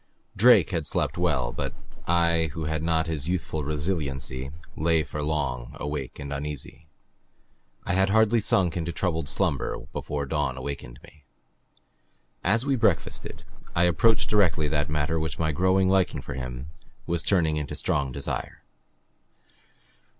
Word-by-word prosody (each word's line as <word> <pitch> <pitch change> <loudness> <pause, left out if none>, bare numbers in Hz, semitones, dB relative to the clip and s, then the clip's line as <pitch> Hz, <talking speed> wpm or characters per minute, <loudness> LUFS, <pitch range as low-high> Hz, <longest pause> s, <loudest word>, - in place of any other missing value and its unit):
Drake 110 -4 +6
had 80 -5 -1
slept - - 0
well. - - +1
But - - -4 0.3
I, 85 -1 +3
who 80 - -4
had 80 0 -1
not 80 0 +1
his 80 -2 -3
youthful 80 -4 -2
resiliency, 70 -4 -2 0.3
lay 80 0 +2
for 75 +1 -5
long, 70 -5 -2
awake 75 -3 -4
and 70 0 -5
uneasy. 75 +2 -5 1.0
I - - 0
had 95 +1 +3
hardly 110 +2 +4
sunk 90 -4 +2
into 85 -1 -2
troubled 80 -4 -1
slumber - - 0 0.2
before 70 -1 -3
dawn 70 -3 -1
awakened 65 -2 -6
me. 75 -2 -18 1.2
As 115 +7 +2
we 140 -1 +2
breakfasted, 110 -8 0 0.3
I 85 - +4
approached 105 +6 +4
directly 90 -7 +3
that 75 -1 0
matter 75 +2 0
which 80 0 -3
my 80 -1 +1
growing 95 +4 +3
liking 95 -7 +2
for - - -6
him 65 +2 -6 0.3
was 85 -1 0
turning 80 -4 +2
into 75 -1 -3
strong 70 -2 0
desire. 70 +2 -5
80 Hz, 145 wpm, -26 LUFS, 70-90 Hz, 1.2 s, Drake